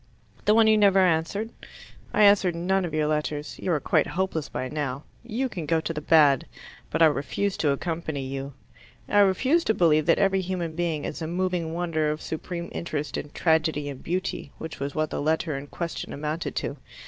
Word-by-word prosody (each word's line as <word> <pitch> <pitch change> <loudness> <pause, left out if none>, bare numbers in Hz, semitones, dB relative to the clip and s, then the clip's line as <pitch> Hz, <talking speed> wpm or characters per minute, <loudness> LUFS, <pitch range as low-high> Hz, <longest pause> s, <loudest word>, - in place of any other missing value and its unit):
"The 210 - +5
one 225 0 +6
you 215 -1 +5
never 200 -2 +5
answered?" 185 +5 +1 0.6
"I 210 - +3
answer 200 -3 +6
none 180 +3 0
of 165 - -6
your 155 -1 +1
letters. 150 0 -2
You 185 - -1
are 150 - +1
quite - - +2
hopeless 180 -4 -2
by 130 - -3
now. 140 -1 -3 0.2
You 240 +3 -2
can 175 -10 -6
go 165 0 +2
to 165 +1 -3
the 150 - -4
bad. 150 -4 +4 0.4
But 165 - +2
I - - +10
refuse 160 +6 0
to 150 - +1
accompany 155 -1 -2
you. 135 +1 -5 0.5
I 205 - +3
refuse 255 - +3
to 220 - +2
believe 155 -2 +3
that 165 - +5
every 195 -1 +2
human 175 -3 -3
being 165 -4 -1
is 155 - -5
a 160 - -2
moving 175 -2 -1
wonder 165 -3 0
of 150 0 -2
supreme 170 +2 -5
interest 150 -3 -4
and 145 - -5
tragedy 160 -3 +1
and 135 -2 -8
beauty 180 -4 -3
which 160 0 -7
was 140 +1 -4
what 155 -1 0
the - - -2
letter 155 0 0
in 140 +1 -6
question 170 +3 -5
amounted 155 +3 -3
to. - - -3
165 Hz, 200 wpm, -26 LUFS, 150-185 Hz, 0.6 s, I